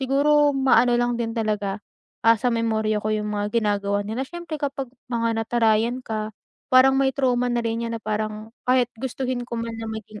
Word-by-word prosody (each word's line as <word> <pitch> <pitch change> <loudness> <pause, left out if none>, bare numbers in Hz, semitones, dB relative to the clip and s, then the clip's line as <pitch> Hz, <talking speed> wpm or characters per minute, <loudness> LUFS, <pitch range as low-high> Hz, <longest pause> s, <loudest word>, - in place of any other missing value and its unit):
siguro 290 +2 +3
maano 265 -2 +4
lang 240 0 +1
din 230 -1 -2
talaga, 210 -2 -1 0.4
ah, 230 0 +6
sa 250 - +2
memorya 220 -2 0
ko 215 - -2
'yung 210 0 -1
mga 205 0 -1
ginagawa 205 -1 0
nila. 225 +6 -3
Siyempre, 345 -2 -6
kapag 275 -3 -3 0.2
mga 230 -1 0
natarayan 230 +1 +2
ka, 215 -1 -4 0.4
parang 265 +1 +7
may 265 0 +2
trauma 250 -2 +1
na 240 0 0
rin 230 0 -1
'yan, 230 0 -3
na 225 - -10
parang 215 +1 -3 0.2
kahit 250 -1 +3
gustuhin 255 -1 -3
ko 235 - -5
man 230 0 -3
na 225 - -5
maging 215 -1 -7
230 Hz, 190 wpm, -23 LUFS, 215-255 Hz, 0.4 s, parang